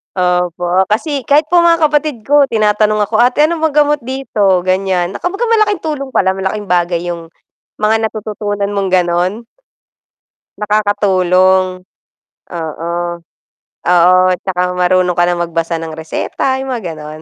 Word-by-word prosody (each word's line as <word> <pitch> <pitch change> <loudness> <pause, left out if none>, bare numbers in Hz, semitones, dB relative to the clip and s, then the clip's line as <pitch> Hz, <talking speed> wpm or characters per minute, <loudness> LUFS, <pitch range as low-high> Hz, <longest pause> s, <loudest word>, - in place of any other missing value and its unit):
Opo, 180 0 0
kasi 270 +5 -2
kahit 295 +2 +4
po 350 - +5
mga 340 0 +5 0.2
kapatid 295 -6 -1
ko 285 +1 +3
tinatanong 215 -1 +1
ako, 215 +2 -1
"ate, 250 +5 +3
ano 330 +1 +1
pong 315 -2 -1
gamot 295 0 +3
dito?", 230 -8 0
ganiyan. 185 -1 0
Na 205 - -7
kumbaga 390 +6 -3
malaking 430 -3 +1
tulong 295 -4 -3
pala, 190 0 +3
malaking 190 +1 -4
bagay 175 -1 +1
'yung 170 -1 -7 0.5
mga 220 +1 +1
natututunan 205 -2 -4
mong 200 -1 -1
gano'n. 180 +5 0 1.2
Nakakatulong. 185 -3 +1 0.7
Oo. 165 0 -5 0.9
Oo, 180 +1 +4 0.2
'tsaka 180 0 -3 0.2
marunong 180 0 +2
ka 175 - +4
rin 175 0 -1
magbasa 165 -1 -2
ng 160 -1 -6
reseta, 260 +11 -3
'yung 270 - -5
mga 240 -6 -4
gano'n. 155 0 -9
200 Hz, 140 wpm, -14 LUFS, 180-250 Hz, 1.2 s, po